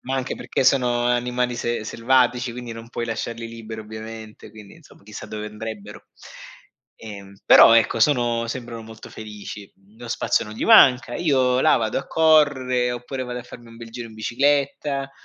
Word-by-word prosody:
ma 130 Hz, +1 st, -4 dB
anche 130 Hz, 0 st, -3 dB
perché -, -, -3 dB
sono 125 Hz, -3 st, +2 dB
animali 125 Hz, 0 st, -1 dB
se 120 Hz, -1 st, -2 dB
selvatici, 125 Hz, +1 st, +1 dB
quindi 120 Hz, -1 st, -7 dB
non 115 Hz, +1 st, -11 dB
puoi 120 Hz, -1 st, -4 dB
lasciarli 115 Hz, 0 st, -5 dB
liberi 115 Hz, -1 st, -8 dB
ovviamente, 110 Hz, 0 st, -10 dB
quindi 105 Hz, -2 st, -14 dB
insomma 160 Hz, -9 st, -20 dB
chissà 105 Hz, +1 st, -10 dB
dove 105 Hz, 0 st, -6 dB
andrebbero. 105 Hz, -1 st, -9 dB, 0.9 s
Ehm, 100 Hz, -3 st, -11 dB
però -, -, +8 dB
ecco 115 Hz, 0 st, +2 dB
sono 120 Hz, -3 st, +2 dB
sembrano 115 Hz, -1 st, -6 dB
molto 110 Hz, 0 st, -12 dB
felici. 105 Hz, -2 st, -9 dB
Mhmm, 100 Hz, +3 st, -27 dB
lo 120 Hz, 0 st, -10 dB
spazio 115 Hz, -, 0 dB
non 105 Hz, -, -10 dB
gli -, -, -4 dB
manca. 130 Hz, -, +6 dB
Io 130 Hz, -6 st, +1 dB
là -, -, +4 dB
vado 110 Hz, -1 st, -1 dB
a 135 Hz, -, -8 dB
correre, 130 Hz, -6 st, +2 dB
oppure 120 Hz, +2 st, -6 dB
vado 125 Hz, 0 st, -5 dB
a -, -, -11 dB
farmi 120 Hz, -1 st, -13 dB
un 115 Hz, -, -14 dB
bel 115 Hz, 0 st, -11 dB
giro 115 Hz, 0 st, -8 dB
in 110 Hz, -, -14 dB
bicicletta. 140 Hz, +4 st, -1 dB
120 Hz, 175 wpm, -22 LUFS, 110-125 Hz, 0.9 s, però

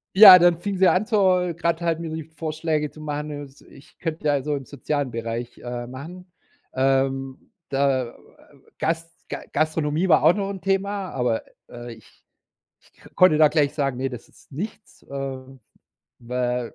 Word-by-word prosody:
Ja, 190 Hz, -3 st, +12 dB
dann 175 Hz, -1 st, +4 dB
fing 195 Hz, +1 st, -3 dB
sie 190 Hz, -, +5 dB
an, 200 Hz, +4 st, +2 dB
zur 185 Hz, -5 st, +2 dB
grad 170 Hz, 0 st, -1 dB
halt 165 Hz, -1 st, -1 dB
mir 165 Hz, -, -4 dB
die 160 Hz, 0 st, -5 dB
Vorschläge 155 Hz, -1 st, -3 dB
zu 155 Hz, -, -14 dB
machen, 150 Hz, 0 st, -4 dB
ne, 145 Hz, -1 st, -6 dB
s 135 Hz, 0 st, -14 dB
ich 135 Hz, -, -19 dB
könnte 160 Hz, -2 st, -4 dB
ja 145 Hz, -2 st, +2 dB
so 150 Hz, 0 st, -1 dB
im 135 Hz, -, -7 dB
sozialen 145 Hz, 0 st, -3 dB
Bereich, 115 Hz, +1 st, -5 dB
äh, 120 Hz, 0 st, -6 dB
machen. 165 Hz, +9 st, -10 dB, 0.4 s
Ähm, 135 Hz, 0 st, 0 dB, 0.2 s
da, 135 Hz, -2 st, +1 dB
äh, -, -, -13 dB, 0.7 s
Gas 165 Hz, +1 st, -2 dB
Ga -, -, -5 dB
Gastronomie 155 Hz, +2 st, 0 dB
war 155 Hz, -, +5 dB
auch -, -, +7 dB
noch 200 Hz, -1 st, -2 dB
'n 195 Hz, -2 st, -7 dB
Thema, 195 Hz, 0 st, -1 dB
aber, 125 Hz, -3 st, -1 dB, 0.3 s
äh, 120 Hz, 0 st, -9 dB
ich 110 Hz, -2 st, -18 dB, 0.6 s
ich -, -, -28 dB
k -, -, -18 dB
konnte 185 Hz, -5 st, +5 dB
da 155 Hz, -1 st, +6 dB
gleich 145 Hz, -3 st, +1 dB
sagen: 140 Hz, -4 st, -1 dB
„Ne, 135 Hz, +1 st, -2 dB
das 125 Hz, -3 st, -10 dB
ist -, -, -23 dB
nichts“, 210 Hz, +7 st, -8 dB
äh, 135 Hz, -1 st, -5 dB, 0.8 s
weil, 125 Hz, 0 st, -3 dB
150 Hz, 180 wpm, -23 LUFS, 135-170 Hz, 0.8 s, Ja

